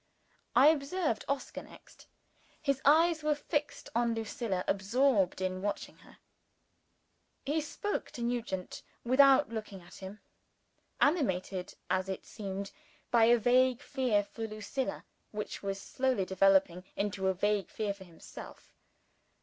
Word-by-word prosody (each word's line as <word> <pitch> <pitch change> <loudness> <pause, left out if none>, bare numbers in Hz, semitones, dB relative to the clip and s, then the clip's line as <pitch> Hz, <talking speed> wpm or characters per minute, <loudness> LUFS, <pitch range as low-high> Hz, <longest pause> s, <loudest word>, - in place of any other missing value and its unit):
I 275 +4 +8
observed 305 -3 0
Oscar, 280 0 -3
next. - - -16 0.5
His 275 -3 0
eyes 320 +3 +5
were 300 0 +1
fixed 295 0 -3
on 235 0 +1
Lucilla 220 -4 -2
absorbed 205 -1 +2
in 185 0 -2
watching 205 +1 -4
her. - - -18 1.3
He 300 +3 +1
spoke 410 +7 -3
to 240 - -5
Nugent, 235 -6 -3 0.2
without 270 +3 +5
looking 215 -3 -6
at 175 - -14
him; 195 +2 -9 0.8
animated, 190 - 0
as 185 +1 0
it 190 - -5
seemed, 200 -2 -6 0.4
by 235 -2 +6
a 240 +1 +6
vague 255 +3 +3
fear 250 -7 +1
for 225 +2 -6
Lucilla, 215 +5 -4 0.2
which 210 -1 -5
was 195 0 -3
slowly 255 -3 0
developing 190 -1 +3
into 200 -1 -1
a 190 - +2
vague 205 0 0
fear 210 -2 -2
for 200 -1 -13
himself. 170 -2 -12
225 Hz, 130 wpm, -31 LUFS, 195-270 Hz, 1.3 s, I